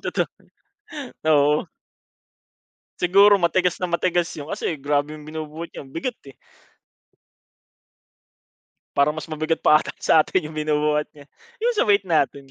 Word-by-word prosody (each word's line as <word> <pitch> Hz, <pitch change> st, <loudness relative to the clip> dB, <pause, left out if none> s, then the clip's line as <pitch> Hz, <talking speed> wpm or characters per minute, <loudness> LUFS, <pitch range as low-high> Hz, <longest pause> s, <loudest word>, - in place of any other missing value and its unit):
Totoo. -, -, -1 dB, 1.0 s
Oo. 150 Hz, +1 st, +3 dB, 1.3 s
Siguro 200 Hz, +3 st, +5 dB
matigas 180 Hz, +1 st, +1 dB
na 180 Hz, -, -1 dB
matigas 175 Hz, 0 st, 0 dB
'yun. 150 Hz, 0 st, -8 dB
Kasi 165 Hz, -, -2 dB
grabe 145 Hz, +1 st, -1 dB
'yung 150 Hz, -, -11 dB
binubuhat 155 Hz, +1 st, -7 dB
niya, -, -, -9 dB
ang 135 Hz, -, -16 dB
bigat, 240 Hz, +9 st, -3 dB, 0.2 s
eh. -, -, -38 dB, 2.6 s
Parang 140 Hz, +2 st, +3 dB
mas 155 Hz, +1 st, -7 dB
mabigat 155 Hz, +1 st, -1 dB
pa 155 Hz, -, +6 dB
ata -, -, -6 dB
sa'tin 155 Hz, 0 st, +2 dB
yung 155 Hz, -, -12 dB
binubuhat 150 Hz, 0 st, +1 dB
niya. 145 Hz, -1 st, -15 dB, 0.4 s
Yung 480 Hz, 0 st, +2 dB
sa -, -, +2 dB
weight 200 Hz, -2 st, +3 dB
natin, 140 Hz, -5 st, 0 dB
155 Hz, 135 wpm, -22 LUFS, 150-175 Hz, 2.6 s, pa